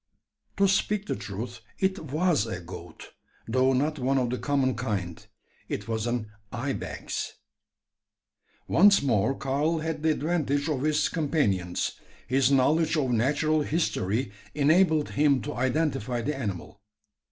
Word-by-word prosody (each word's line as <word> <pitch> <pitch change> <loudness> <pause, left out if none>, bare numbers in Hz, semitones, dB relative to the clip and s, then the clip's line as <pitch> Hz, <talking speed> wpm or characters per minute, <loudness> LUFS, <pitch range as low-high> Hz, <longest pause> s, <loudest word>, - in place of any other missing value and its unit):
To 200 0 +4
speak 205 +1 +1
the - - -2
truth, 115 +5 -6 0.2
it 190 0 0
was 155 - +2
a 95 -5 -4
goat; 85 -1 -10 0.4
though 130 +3 +3
not 150 +4 0
one 135 +2 +1
of 125 -2 0
the 125 - -2
common 140 -3 +1
kind. 105 -8 -3 0.5
It - - -4
was 110 0 -2
an 120 -3 -2 0.2
ibex. - - -4 1.3
Once 200 -1 +5
more 125 0 +2
Karl 145 +5 0
had 160 -1 -3
the 160 - +2
advantage 150 -2 0
of 140 -4 -1
his 150 +1 +2
companions. 105 - -1 0.3
His 135 +1 +3
knowledge 155 +4 +3
of 135 -4 +1
natural 145 +6 +2
history 130 - -1 0.2
enabled 155 +1 +3
him 145 -2 +3
to 150 - -4
identify 130 -2 0
the 150 +4 -1
animal. 100 -5 -5
135 Hz, 135 wpm, -27 LUFS, 120-155 Hz, 1.3 s, Once